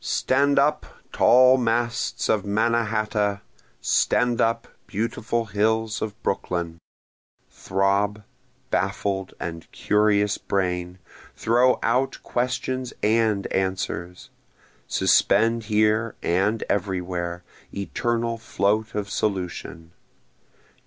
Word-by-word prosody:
Stand 140 +2 +1
up, 150 +2 +2 0.2
tall 130 +1 +6
masts 120 0 -1
of 110 - +2
Mannahatta! 105 -1 0 0.4
stand 120 - +2
up, 115 0 0 0.2
beautiful 115 +2 -2
hills 110 +2 0
of 110 0 -4
Brooklyn! 85 -3 -2 0.7
Throb, 100 +2 0 0.5
baffled 95 -1 -1
and 85 -1 -6
curious 105 -1 +2
brain! 90 -2 -2 0.4
throw 125 +3 +3
out 125 +4 +1
questions 130 0 -2
and 110 -2 +2
answers! 95 -2 -3 0.6
Suspend 115 +2 +3
here 110 +1 +1
and 100 +6 +1
everywhere, 90 -3 -2 0.3
eternal 115 +3 -2
float 110 +1 -1
of 105 -1 -2
solution! 90 -5 -3
105 Hz, 85 wpm, -24 LUFS, 95-115 Hz, 0.7 s, tall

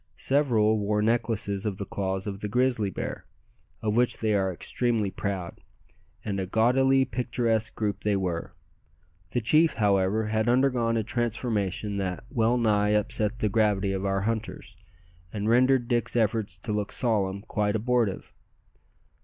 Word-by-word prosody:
Several 115 -6 +2
wore 105 +1 0
necklaces 110 -3 0
of 100 -3 -3
the 100 - -4
claws 95 0 -3
of 100 -2 -5
the 105 - -4
grizzly 120 -2 +1
bear, - - -6 0.6
of 105 -1 0
which 125 +1 +2
they 110 -1 0
are 95 -2 +1
extremely 110 +2 -1
proud; 95 -2 -4 0.6
and 100 -2 -2
a 95 - -3
gaudily 130 +5 +3
picturesque 115 -2 -1
group 105 -2 -2
they 105 -1 0
were. 90 -4 -3 0.7
The 120 - -1
chief, 155 +8 +3
however, 100 +1 +2
had 110 +1 +1
undergone 120 -2 +2
a 110 - 0
transformation 110 -3 -2
that 95 -1 -3
well 115 +1 +2
nigh 105 -3 +2
upset 105 +1 -1
the 110 - 0
gravity 100 -2 +1
of 95 0 -3
our 95 0 0
hunters, 110 +1 -4 0.6
and 105 -1 -3
rendered 125 +1 +3
Dick's 120 0 0
efforts 110 -5 0
to 105 +5 -5
look 105 -1 -2
solemn 100 -5 0
quite 105 -1 -1
abortive. 115 -2 0
110 Hz, 150 wpm, -27 LUFS, 100-120 Hz, 0.7 s, gaudily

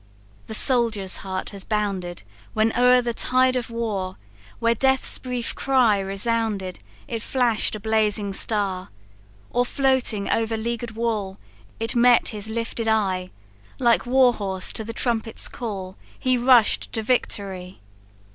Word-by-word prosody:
"The 220 - -3
soldier's 225 -6 +4
heart 190 -1 -5
has 200 -2 -8
bounded 195 -5 -3 0.3
When 220 +1 +1
o'er 250 0 +5
the 235 -1 -2
tide 255 +2 +2
of 245 -2 -2
war; 210 -5 -3 0.4
Where 230 0 +2
death's 265 +3 +1
brief 250 -2 -4
cry 250 -7 +2
resounded, 195 -1 -2 0.3
It 230 -2 -4
flash'd 235 -4 0
a - - -6
blazing 210 -2 0
star. 195 -3 -1 0.6
Or 245 - +2
floating 250 -6 0
over 225 0 0
leaguer'd 235 0 -4
wall, 215 -4 -2 0.4
It 225 +1 -2
met 240 0 +5
his 215 0 -5
lifted 230 0 -3
eye; 190 -4 0 0.5
Like 240 -1 +2
war 255 -1 +4
horse 190 -4 -2
to 220 - -2
the 225 - -6
trumpet's 225 -1 0
call, 195 -5 -6 0.2
He 255 -1 +1
rush'd 245 -2 +3
to 225 - -2
victory! 195 -6 -2
225 Hz, 135 wpm, -23 LUFS, 200-240 Hz, 0.6 s, o'er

